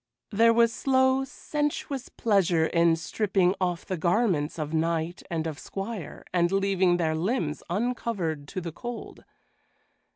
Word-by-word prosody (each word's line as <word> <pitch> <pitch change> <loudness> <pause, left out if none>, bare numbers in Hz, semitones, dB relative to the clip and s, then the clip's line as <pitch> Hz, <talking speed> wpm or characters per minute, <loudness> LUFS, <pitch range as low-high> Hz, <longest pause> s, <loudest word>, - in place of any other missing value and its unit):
There 230 +2 +5
was 230 0 +4
slow, 260 0 +3
sensuous 290 -1 -3
pleasure 185 -7 +2
in 170 0 +3
stripping 185 +2 +1
off 180 -2 -1
the 185 - -3
garments 170 -3 +1
of 155 0 -4
knight 165 +1 0
and 165 -2 -2
of 155 -3 -4
squire 195 -4 -6
and 175 -1 +2
leaving 195 -2 +2
their 160 -2 +1
limbs 165 - -1
uncovered 195 - -2
to 185 - -5
the 170 -1 -5
cold. 240 +7 -7
185 Hz, 135 wpm, -27 LUFS, 165-230 Hz, -, There